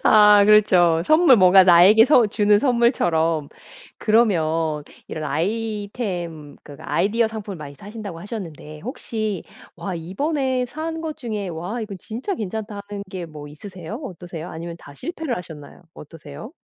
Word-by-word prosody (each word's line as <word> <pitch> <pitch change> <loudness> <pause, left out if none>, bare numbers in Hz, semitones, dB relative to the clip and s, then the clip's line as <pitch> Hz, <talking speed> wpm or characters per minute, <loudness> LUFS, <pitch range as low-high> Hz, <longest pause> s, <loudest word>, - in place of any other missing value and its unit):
아 210 -1 +7
그렇죠. 180 -6 +5
선물 310 - +6
뭔가 185 0 +7
나에게 185 +5 +7
서 250 -4 +5
주는 205 0 +3
선물처럼. 175 - +1 0.5
그러면 165 -9 +1 0.2
이런 155 - -6
아이템 190 - -3
그러니까 150 +3 -10
아이디어 220 +6 +2
상품을 215 -3 -7
많이 145 -3 -9
사신다고 205 0 -8
하셨는데 165 -7 -8
혹시 215 - -4 0.3
와 195 - -5
이번에 255 - -1
산 315 +6 -5
것 320 -2 -5
중에 215 -6 -4
'와 175 +8 -5
이건 210 -3 -6
진짜 245 - -4
괜찮다.' 215 - -5
하는 205 -1 -6
게 185 -3 -5
뭐 150 -2 -10
있으세요? 180 +4 -9
어떠세요? 175 -5 -8
아니면 165 +1 -7
다 145 - -14
실패를 320 - -4
하셨나요 160 -3 -10
어떠세요? 150 - -11
200 Hz, 330 characters per minute, -22 LUFS, 165-225 Hz, 0.5 s, 아